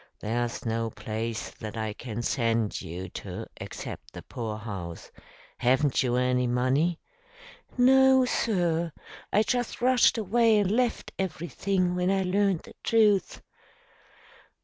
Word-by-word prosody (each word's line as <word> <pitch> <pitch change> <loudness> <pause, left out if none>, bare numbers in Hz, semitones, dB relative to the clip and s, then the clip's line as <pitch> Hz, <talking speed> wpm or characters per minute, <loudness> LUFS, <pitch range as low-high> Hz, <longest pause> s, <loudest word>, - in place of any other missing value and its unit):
There's 120 +3 -2
no 115 0 -1
place 110 +2 -4
that 110 +1 -8
I 110 -1 -2
can 120 0 -6
send 115 -4 0
you 90 +3 -6
to - - -7
except - - -8
the - - -9
poorhouse. 105 -7 -6 0.5
Haven't 130 +3 +3
you 125 -2 +1
any 125 0 +2
money?" 130 +8 +1 0.8
"No, 265 +1 +6
sir. 170 -9 0 0.4
I 210 - +4
just 245 +1 -1
rushed 250 -1 +4
away 225 +1 +3
and 200 -2 +2
left 245 +1 0
everything 180 +1 -1
when 180 0 0
I 195 0 +2
learned 195 -1 +1
the - - -14
truth." 215 -4 +2
155 Hz, 125 wpm, -27 LUFS, -, 0.8 s, No